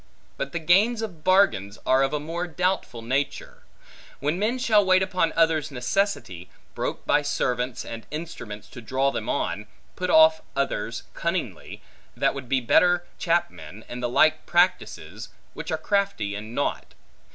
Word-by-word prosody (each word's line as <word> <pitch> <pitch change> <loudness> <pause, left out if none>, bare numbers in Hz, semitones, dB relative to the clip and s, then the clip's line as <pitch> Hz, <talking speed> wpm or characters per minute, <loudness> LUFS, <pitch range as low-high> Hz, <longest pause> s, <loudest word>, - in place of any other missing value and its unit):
But 140 - -4
the - - -3
gains 200 +8 +3
of 175 -8 -7
bargains, 180 - +3
are 130 +1 +4
of 135 - +2
a 150 - -1
more 165 +4 -4
doubtful 175 -8 -2
nature; 135 +4 -2 0.6
when 150 +5 -1
men 220 +5 +1
shall 220 -5 +4
wait 185 0 +4
upon 185 -4 0
others' 160 -2 +2
necessity, 125 - -2 0.2
broke - - -4
by 145 - +3
servants 125 -4 -1
and 115 -1 -8
instruments 150 -9 -7
to 120 - -10
draw 130 +4 0
them - - -4
on, 105 +5 -2 0.3
put 180 0 -3
off 160 0 +6
others 140 0 -2
cunningly, - - -4 0.3
that - - +2
would 135 -3 -8
be 130 -1 +2
better 175 +8 +4
chapmen, 110 - -2
and 125 0 -6
the 120 - -1
like 155 +5 +3
practices, 175 +2 0 0.2
which - - -7
are - - 0
crafty 200 - -1
and 110 +3 -7
naught. - - -2
155 Hz, 155 wpm, -25 LUFS, 125-180 Hz, 0.6 s, off